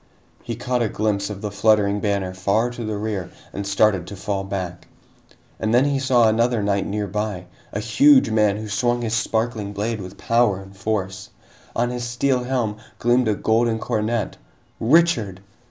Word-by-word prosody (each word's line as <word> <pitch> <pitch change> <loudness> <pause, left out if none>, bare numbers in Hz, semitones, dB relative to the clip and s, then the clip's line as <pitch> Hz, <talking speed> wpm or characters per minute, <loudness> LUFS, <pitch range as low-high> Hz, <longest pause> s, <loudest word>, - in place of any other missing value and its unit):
He 115 - -5
caught 125 +1 -1
a 115 - +1
glimpse 100 -1 -1
of 100 -2 -6
the 105 - -4
fluttering 105 -1 +3
banner 100 -3 -1
far 100 +6 +1
to 120 -1 -6
the 110 -1 -3
rear 105 -4 -3 0.2
and 100 0 -4
started 100 -2 +2
to 100 - -7
fall 100 0 -3
back. 95 -3 -5 0.7
And 110 +2 +1
then 125 +3 +5
he 140 -1 +1
saw 125 -4 +4
another 115 0 +2
knight 100 -1 0
nearby, 105 -2 -3 0.3
a 105 - -3
huge 120 +4 +5
man 105 -2 +3
who 110 0 -6
swung 120 +4 0
his 110 -1 -2
sparkling 110 -2 -1
blade 105 +1 -2
with 95 +1 -9
power 115 -5 +2
and 95 0 -13
force. 100 -1 -3 0.5
On 120 +1 +1
his 125 0 -4
steel 125 +1 0
helm 120 -5 -1 0.2
gleamed 120 +1 +2
a 105 - +2
golden 115 +2 +1
coronet! 110 +1 -2 0.4
Richard! 120 - +3
110 Hz, 170 wpm, -22 LUFS, 100-120 Hz, 0.7 s, then